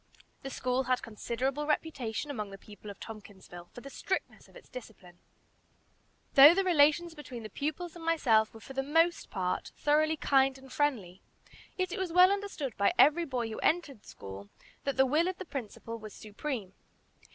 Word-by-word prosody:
The 270 - -6
school 255 0 -1
had 255 -1 0
considerable 255 +6 -3
reputation 290 -4 -2
among 210 -6 -4
the 195 - -9
people 205 +1 -12
of 200 - -10
Tompkinsville 195 -5 -11
for 245 - -11
the 275 - -9
strictness 375 - -4
of - - -22
its - - -14
discipline. 200 -8 -12 1.1
Though 290 +5 +10
the 390 - +2
relations 335 -1 +3
between 260 -7 -9
the 215 - -8
pupils 310 - -4
and 340 - -10
myself 240 -10 +3
were 225 - -13
for 270 - -10
the 270 - -1
most 330 +5 +2
part 185 -2 -2
thoroughly 310 +2 +2
kind 270 -2 +3
and 265 -1 -14
friendly, 215 -12 -1 0.6
yet 370 -1 -1
it - - -4
was 375 -3 -2
well 360 +2 +7
understood 395 - -3
by 200 - +3
every 310 +5 +5
boy 250 -5 -2
who 220 - -6
entered 300 -9 0
school 100 +1 -10 0.4
that 275 -1 -1
the 265 - +5
will 305 +6 +2
of 370 0 -3
the 375 - -7
Principal 230 - -6
was 215 -1 -10
supreme. 215 -2 -5
270 Hz, 180 wpm, -30 LUFS, 220-315 Hz, 1.1 s, Though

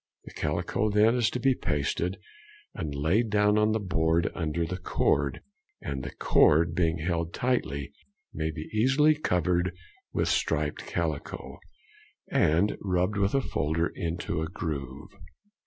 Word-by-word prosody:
The - - -11
calico 85 +7 -1
is - - -4
then 115 +4 +4
to 120 +2 +1
be 135 +2 +3
pasted 85 - -1 0.6
and 75 -4 -4
laid 90 +11 +1
down 105 0 +3
on 105 0 +3
the 110 - +1
board 85 -4 +1
under 85 0 -1
the 90 +3 -5
cord, 70 -5 0 0.4
and 70 -2 -4
the - - -5
cord 80 +2 +4
being 80 -1 +1
held 85 0 -2
tightly 70 - -1 0.4
may 80 0 -2
be 80 0 -6
easily 135 +8 +4
covered 90 - 0 0.3
with - - 0
the - - +1
striped - - -1
calico, - - -4 0.7
and 95 - +3
rubbed 95 +1 0
with 100 +4 +1
a 135 - +3
folder 80 - -1
into 85 -1 -3
a 80 - -2
groove. 75 -5 -5
85 Hz, 145 wpm, -28 LUFS, 80-105 Hz, 0.7 s, then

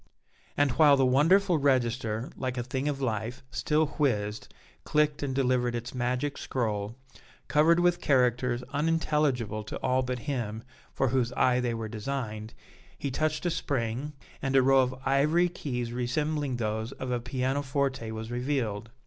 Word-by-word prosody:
And 145 -2 +3
while 145 +1 +6
the 135 - +4
wonderful 165 +7 +4
register, 120 -4 0
like 130 -1 -3
a 120 - -1
thing 130 +3 -3
of 140 -2 -2
life, 115 +2 -2
still 155 +1 +1
whizzed, 105 -7 0 0.3
clicked 150 -1 +1
and 135 -2 -2
delivered 125 -2 +1
its 120 +1 -5
magic 125 +3 -1
scroll, 110 -3 -2 0.5
covered 160 +3 +4
with 175 0 +2
characters 125 -2 +2
unintelligible 145 -8 0
to - - -5
all 130 +1 +2
but 125 0 -2
him 115 -6 -3 0.3
for 135 - 0
whose 125 -1 +1
eye 125 -1 +3
they 120 -2 -1
were 115 -1 -4
designed, 110 -1 -5 0.4
he 140 - -3
touched 155 +4 -1
a 175 - +2
spring, 135 -1 -2 0.3
and 135 0 -1
a 135 - +6
row 135 +1 +5
of 130 0 +1
ivory 150 +6 +3
keys 125 -8 -4
resembling 140 +3 -1
those 110 +1 -2
of 130 -1 -5
a 120 - 0
piano 130 +3 -1
forte 135 -3 -1
was 110 +1 -6
revealed. 120 -4 -2
130 Hz, 155 wpm, -28 LUFS, 120-145 Hz, 0.5 s, while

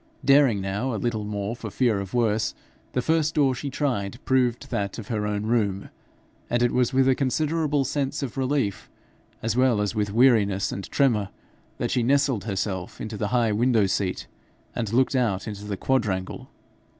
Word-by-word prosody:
Daring 135 -6 +5
now 105 +6 -2
a - - -2
little 110 -1 -2
more 105 +1 -3
for 115 -2 -7
fear 115 -1 +1
of 100 +3 -6
worse, 110 -2 +1 0.4
the 125 - 0
first 160 -1 +1
door 140 -3 +3
she 135 +3 -4
tried 120 -9 -2
proved 125 -2 +1
that 100 -2 -2
of 110 -3 -8
her 105 -3 -1
own 105 0 -2
room, 105 -4 0 0.6
and 120 0 +1
it 120 - +3
was 125 -1 +2
with 135 0 +3
a 135 - +5
considerable 150 +2 0
sense 140 +1 -2
of 130 - -5
relief, 130 -6 -1 0.5
as 115 0 0
well 125 -3 +3
as 105 0 0
with 105 -2 -1
weariness 105 -5 +3
and 100 - -6
tremor, 115 -8 +2 0.5
that - - -2
she 125 - +2
nestled 130 -4 +2
herself 95 -3 -3
into 110 0 -5
the 105 0 -2
high 120 -1 +2
window 115 0 +3
seat, 95 -1 -1 0.5
and 110 -3 -3
looked 130 +4 +2
out 115 -7 0
into 105 -1 -6
the 100 -1 -4
quadrangle. 105 -8 -1
115 Hz, 180 wpm, -25 LUFS, 105-130 Hz, 0.6 s, Daring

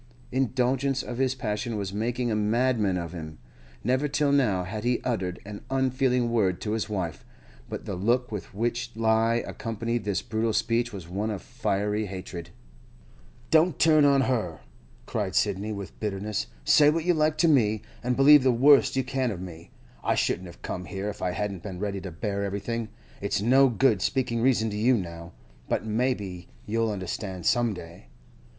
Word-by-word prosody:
Indulgence 130 +1 +1
of 120 0 -6
his 135 0 +1
passion 110 -1 -3
was 100 -2 -4
making 120 +3 -1
a - - +1
madman 105 -2 +1
of 85 -1 -5
him. 80 -2 -7 0.5
Never 130 +5 +1
till 145 0 +1
now 115 -10 +2
had 105 +4 -5
he 120 0 +1
uttered 95 -8 -2
an 100 0 -8
unfeeling 130 -2 +1
word 95 -6 +1
to 105 - -2
his 110 0 -1
wife, 90 -6 -3 0.5
but - - -6
the - - -4
look 120 +7 +1
with 105 -3 -6
which 120 +4 -2
he 115 - -4
accompanied 115 0 0
this 100 -2 -1
brutal 110 0 -1
speech 115 +2 +1
was 95 -6 -8
one 100 +5 -2
of 100 -4 -4
fiery 105 +2 -1
hatred. 90 -3 -7 1.0
'Don't 160 +2 +4
turn 155 -2 +5
on 140 -1 +5
her!' 110 - -1 0.4
cried - - -2
Sidney, 100 +3 +1
with 100 -4 -7
bitterness. 105 0 -2 0.2
'Say 145 - +6
what 160 +1 0
you 180 - +4
like 155 -1 +1
to 170 - +4
me, 110 -8 +3 0.2
and 125 0 0
believe 145 +2 +8
the 130 0 +4
worst 135 +4 +5
you 130 - +1
can 130 0 -1
of 100 -6 -4
me; 85 -3 -9 0.3
I - - +2
shouldn't 90 +1 0
have 85 - -14
come 90 0 -4
here 95 +3 -4
if 105 - -8
I 90 - 0
hadn't 100 0 -3
been 95 -2 -6
ready 100 0 -3
to 95 - -6
bear 100 +3 -3
everything. 110 +3 -3 0.3
It's 100 -1 0
no 130 +6 +5
good 120 -4 +2
speaking 120 -1 0
reason 115 -3 +2
to 105 - -4
you 120 +3 +4
now, 85 -3 -7 0.4
but - - 0
maybe 105 -6 -2 0.2
you'll 115 +1 0
understand 95 -2 -5
some 120 -3 +2
day. 85 -7 -11
110 Hz, 180 wpm, -27 LUFS, 100-125 Hz, 1.0 s, believe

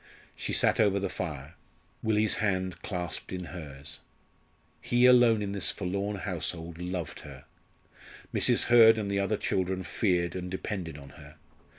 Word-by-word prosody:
She - - -4
sat - - +3
over 100 -2 +3
the 100 -1 -2
fire, 75 -4 -6 0.5
Willie's 110 -1 +2
hand 95 -3 -1
clasped 90 -4 -5
in 90 -1 -4
hers. 70 -4 -7 0.8
He 120 +1 +2
alone 120 -4 +6
in 100 - -3
this 100 -1 +2
forlorn 100 +2 -2
household 85 -3 -4
loved 90 -4 -5
her. - - -12 0.9
Mrs. - - +3
Hurd 115 -2 +7
and 100 -2 -2
the 100 - 0
other 100 +2 0
children 95 -1 -1
feared 90 -6 0
and 90 -1 -5
depended 90 -4 -5
on 70 -1 -12
her. 70 +1 -14
95 Hz, 150 wpm, -28 LUFS, 85-105 Hz, 0.9 s, Hurd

